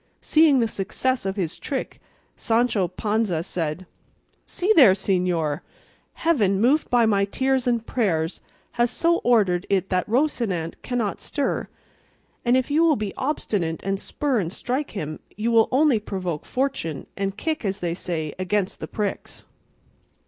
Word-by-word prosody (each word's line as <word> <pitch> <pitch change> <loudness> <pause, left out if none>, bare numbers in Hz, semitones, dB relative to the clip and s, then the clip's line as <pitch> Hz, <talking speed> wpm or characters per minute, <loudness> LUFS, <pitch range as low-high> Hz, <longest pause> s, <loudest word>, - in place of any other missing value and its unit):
Seeing 305 -5 +4
the 230 - +2
success 220 +3 -2
of 190 - -2
his 180 -5 -3
trick, 275 -3 -4 0.3
Sancho 225 -5 +1
Panza 205 -3 -1
said: 170 +1 -3 0.6
"See 395 +4 +1
there, 255 - +8
señor! 180 -6 0 0.5
Heaven, 215 - +2
moved 265 +8 +3
by 240 -2 +4
my 200 -2 +3
tears 260 +5 0
and 235 -2 +1
prayers, 170 -10 -1 0.3
has 240 0 +1
so 335 +6 +2
ordered 200 -7 +2
it 195 -1 +1
that 185 +2 0
Rocinante 225 - 0
cannot 235 -6 -2
stir; 285 -2 -2 0.8
and 245 +1 +4
if 260 +2 -1
you 305 +3 +3
will 325 -3 +4
be 210 -5 -3
obstinate, 200 - -2
and 195 0 -1
spur 275 0 -1
and 170 -4 -2
strike 255 +8 -3
him, 155 -6 -5 0.2
you 225 +2 0
will 225 -1 +4
only 270 -3 +4
provoke 185 -6 -4
fortune, 250 - -2
and 195 0 -3
kick, 315 +3 -2
as 195 -2 -1
they 175 -3 -2
say, 160 -4 -4
against 195 +1 -1
the - - -5
pricks." 205 -2 -4
210 Hz, 150 wpm, -24 LUFS, 185-255 Hz, 0.8 s, there